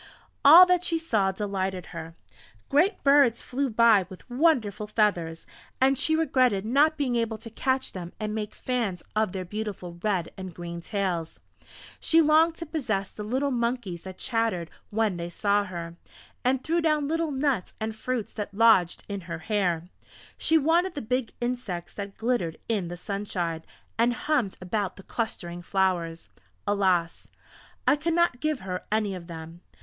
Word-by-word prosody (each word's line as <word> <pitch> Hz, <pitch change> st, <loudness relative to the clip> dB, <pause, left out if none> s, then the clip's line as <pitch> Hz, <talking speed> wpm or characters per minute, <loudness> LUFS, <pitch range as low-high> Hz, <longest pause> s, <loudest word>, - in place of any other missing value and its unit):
All 330 Hz, +6 st, +11 dB
that 360 Hz, -1 st, +2 dB
she 335 Hz, -2 st, +1 dB
saw 220 Hz, -12 st, +1 dB
delighted 190 Hz, -2 st, -3 dB
her. 165 Hz, +1 st, -7 dB, 0.5 s
Great 355 Hz, +8 st, +2 dB
birds 275 Hz, -4 st, +5 dB
flew 270 Hz, +2 st, -1 dB
by 220 Hz, -4 st, +5 dB
with 185 Hz, -, -12 dB
wonderful 240 Hz, -, +2 dB
feathers, 180 Hz, -7 st, 0 dB, 0.3 s
and 270 Hz, +1 st, +4 dB
she 315 Hz, +4 st, +2 dB
regretted 255 Hz, -10 st, +2 dB
not 295 Hz, +7 st, +3 dB
being 265 Hz, -4 st, 0 dB
able 230 Hz, -2 st, 0 dB
to 225 Hz, +1 st, -10 dB
catch 260 Hz, +3 st, -1 dB
them 175 Hz, -2 st, -7 dB
and 215 Hz, -1 st, -3 dB
make 215 Hz, -1 st, -4 dB
fans 230 Hz, -8 st, -2 dB
of 215 Hz, -3 st, +2 dB
their 185 Hz, -1 st, -4 dB
beautiful 190 Hz, -3 st, -5 dB
red 190 Hz, -5 st, 0 dB
and 185 Hz, -3 st, -8 dB
green 170 Hz, -1 st, -6 dB
tails. 180 Hz, -4 st, -2 dB, 0.6 s
She 325 Hz, -, +4 dB
longed 320 Hz, +1 st, +5 dB
to 335 Hz, -, -6 dB
possess 220 Hz, -, -2 dB
the -, -, -9 dB
little 260 Hz, +7 st, -1 dB
monkeys 235 Hz, -8 st, -2 dB
that 190 Hz, -1 st, -8 dB
chattered 225 Hz, -8 st, -1 dB, 0.2 s
when 215 Hz, -3 st, 0 dB
they 170 Hz, 0 st, -4 dB
saw 205 Hz, +3 st, +1 dB
her, 170 Hz, -2 st, -7 dB, 0.5 s
and 260 Hz, +1 st, +1 dB
threw 335 Hz, +2 st, +1 dB
down 305 Hz, -3 st, +2 dB
little 325 Hz, +1 st, 0 dB
nuts 270 Hz, -7 st, -1 dB
and 220 Hz, 0 st, -3 dB
fruits 240 Hz, 0 st, -3 dB
that 205 Hz, -2 st, -5 dB
lodged 215 Hz, -6 st, +4 dB
in 200 Hz, -1 st, -4 dB
her 165 Hz, -, -3 dB
hair. 175 Hz, -2 st, -1 dB, 0.5 s
She 320 Hz, -, +3 dB
wanted 335 Hz, +4 st, +2 dB
the 285 Hz, -, -4 dB
big 250 Hz, +1 st, -1 dB
insects 240 Hz, -8 st, -3 dB
that 200 Hz, -1 st, -7 dB
glittered 220 Hz, -9 st, -1 dB
in 205 Hz, -6 st, 0 dB
the 175 Hz, +1 st, -6 dB
sunshine, 175 Hz, -4 st, -3 dB, 0.4 s
and 240 Hz, +1 st, +3 dB
hummed 260 Hz, -8 st, 0 dB
about 190 Hz, +1 st, -2 dB
the 195 Hz, -, -12 dB
clustering 175 Hz, -7 st, -4 dB
flowers.... 175 Hz, -3 st, 0 dB, 0.4 s
Alas! 190 Hz, -5 st, +1 dB, 0.6 s
I -, -, +5 dB
could 325 Hz, +3 st, -1 dB
not 340 Hz, -8 st, +2 dB
give 310 Hz, -2 st, -1 dB
her 185 Hz, -1 st, -4 dB
any 215 Hz, -2 st, +1 dB
of 175 Hz, -2 st, -8 dB
them! 165 Hz, 0 st, -9 dB
215 Hz, 165 wpm, -27 LUFS, 185-265 Hz, 0.6 s, All